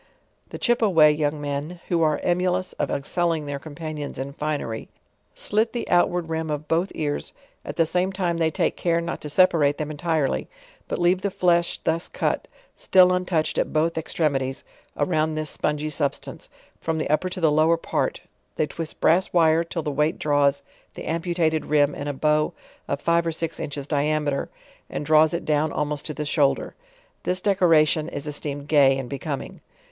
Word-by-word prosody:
The - - -7
Chipaway 195 -11 +4
young 150 0 -1
men, 145 +4 -4
who 170 -2 +2
are 155 -2 +2
emulous 180 +1 0
of - - 0
excelling 165 +2 -1
their 140 -1 -4
companions 155 0 -6
in 135 +2 -5
fineny, 145 -7 -3 0.5
slit 220 +2 0
the 240 - -3
outward 175 -1 +2
rim 160 0 -3
of 150 0 -3
both 170 +4 +1
ears; 145 -2 -3 0.3
at - - -6
the 165 - +3
same 180 +3 0
time 180 -3 -1
they 160 -1 +3
t^ke 165 +1 0
care 170 -1 +1
not 170 0 -4
to 150 - -6
separate 150 -4 +4
them 155 0 -3
entire 155 -1 0
ly, - - -3 0.4
but - - -2
leave 180 +2 +2
the 200 - 0
flesh 175 -2 +1
thus 165 +1 0
cut, - - -2 0.3
still 185 -1 +5
untouched 180 -3 0
at - - 0
both 160 +2 +1
ex 160 0 -4
tremities; 135 -4 0 0.3
around 155 0 +1
this 155 -1 -3
spungy 150 +1 -1
substance, 140 -1 -3 0.3
from 160 -1 -2
the 155 - -1
upper 155 +5 +1
to 185 - -5
the 160 -3 +3
lower 160 +2 +4
part, - - -2 0.3
they - - +1
twist 160 +1 -7
brass 180 +4 +3
wire 165 -1 +4
till 165 -1 -4
the 150 - -2
weight 150 +4 +1
draw 145 -1 +2
s 140 0 -1 0.3
the - - -7
amputated 165 -1 0
rim 145 -1 +3
in 145 - -5
a 145 - -1
bow 150 +2 +1 0.3
of 140 - -2
five 170 +1 +2
or - - +1
six 165 0 -3
inches 145 -1 -5
diameter 145 -1 0 0.4
and 145 - -4
draws 155 0 +5
it 170 - -3
down 150 0 +1
almost 150 -1 -2
to 155 - -4
the 150 - -3
shoulder. 145 -2 +1 0.5
This 185 0 -1
decoration' 165 -5 +3
is 145 - -6
esteemed 145 -1 -4
gay 140 -3 +5
and 135 -2 -4
becoming. 140 +2 -5
155 Hz, 185 wpm, -24 LUFS, 145-170 Hz, 0.5 s, still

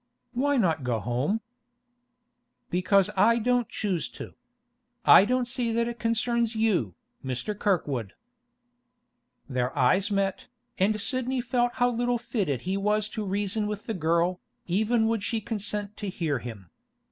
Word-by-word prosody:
'Why 280 +3 +1
not 165 - +1
go 125 -2 0
home?' 125 - -1 1.3
'Because 190 +3 +3
I 225 +5 +5
don't 245 +1 +1
choose 190 -6 -2
to. - - -8 0.7
I 195 - +9
don't 250 +2 +1
see 240 -2 -1
that 235 +1 +1
it 235 -1 -5
concerns 230 0 0
you, 190 - +1 0.3
Mr. 130 - -3
Kirkwood.' 145 - -1 1.3
Their 130 -1 -2
eyes 185 - +3
met, 195 -1 -1 0.3
and 210 +3 +2
Sidney 255 +3 -1
felt 245 0 0
how 245 0 +2
little 240 +1 0
fitted 185 - -2
he 190 +2 -1
was 210 +1 +1
to 215 -1 -4
reason 205 +2 -1
with 210 0 -5
the 225 - -2
girl, 170 +1 +1 0.2
even 220 +5 +2
would 225 -1 +1
she 225 +1 -1
consent 210 -1 -3
to 205 - -4
hear 155 -7 -1
him. 105 -8 -9
210 Hz, 145 wpm, -27 LUFS, 175-230 Hz, 1.3 s, I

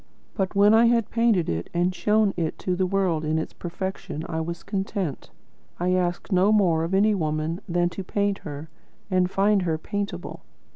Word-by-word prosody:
But 190 -3 -2
when 205 +2 +6
I 230 +1 +6
had 230 -2 +2
painted 230 -7 +2
it 85 +1 -3
and 175 +2 +2
shown 210 +1 +2
it 165 -3 -2
to 185 - -2
the 185 0 +1
world 180 -5 0
in 155 +1 0
its 160 - -3
perfection, 175 -3 -5
I 160 -1 -2
was 170 +1 -5
content. 195 - -3 0.5
I 180 +1 +1
asked 180 +2 -1
no 190 +2 +4
more 175 -7 +3
of 170 +3 -1
any 210 +2 +4
woman 155 -1 -2
than 175 0 +2
to 185 +2 -6
paint 200 +1 -1
her, 145 +1 -7 0.4
and 185 -1 +2
find 200 +1 +2
her 165 -3 0
paintable. 200 +5 -5
185 Hz, 185 wpm, -25 LUFS, 165-200 Hz, 0.5 s, when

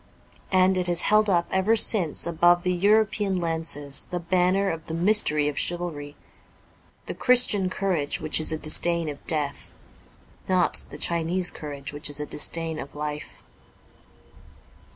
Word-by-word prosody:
And 185 0 +2
it 180 - 0
has 175 -1 +2
held 215 0 +2
up 170 -2 +1
ever 190 +4 +1
since 195 -7 +4
above 175 +1 +2
the 180 -1 0
European 205 +1 +1
lances 160 -5 -2
the 180 - -5
banner 185 +3 0
of 160 -1 -8
the 160 - -5
mystery 170 -5 +2
of 145 -1 -2
chivalry: 160 -5 -4 0.9
the - - -6
Christian 240 -7 +3
courage 185 -7 -2
which 155 0 +2
is 155 - +2
a 160 - -2
disdain 165 +1 0
of 145 - -9
death; 150 -3 -2 0.7
not 185 -2 +1
the - - -10
Chinese 170 +1 -1
courage 140 -2 -8
which 145 0 -5
is 145 - -6
a 150 - -4
disdain 160 +2 -1
of 140 - -9
life. 150 0 -7
170 Hz, 150 wpm, -24 LUFS, 150-185 Hz, 0.9 s, since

